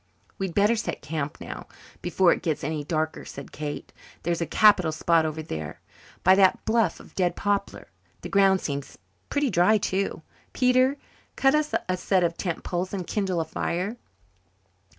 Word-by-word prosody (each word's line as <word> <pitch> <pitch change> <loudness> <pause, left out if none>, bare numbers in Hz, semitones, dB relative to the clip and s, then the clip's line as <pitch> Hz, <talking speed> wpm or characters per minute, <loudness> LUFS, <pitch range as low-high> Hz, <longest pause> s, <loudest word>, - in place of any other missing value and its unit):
"We'd 190 -3 -3
better 210 +3 +4
set 220 - -4
camp 150 -2 -3
now, - - -8 0.3
before 175 0 +3
it - - -5
gets 160 -3 -2
any 150 +1 -2
darker," 155 +1 -2
said 140 - -9
Kate. 150 -1 -6 0.3
"There's 170 0 -1
a 170 - -1
capital 200 -6 +5
spot 160 0 +2
over 155 0 -4
there, 80 - -6 0.4
by 185 - +7
that 190 -1 +4
bluff 225 0 +2
of - - -15
dead 175 -2 0
poplar. 200 -1 -2 0.3
The - - -6
ground 195 -1 +4
seems 140 -2 -5 0.3
pretty 285 -3 +1
dry 185 +5 +4
too. 190 -4 -2 0.3
Peter, 255 +2 +3 0.4
cut 270 +1 +4
us 300 0 +1
a 185 0 0
set 185 0 +2
of 170 -1 0
tent 175 -2 -3
poles 180 +2 -3
and 185 -2 -4
kindle 190 -2 -1
a - - -3
fire." 185 +7 -2
180 Hz, 170 wpm, -26 LUFS, 160-205 Hz, 0.4 s, by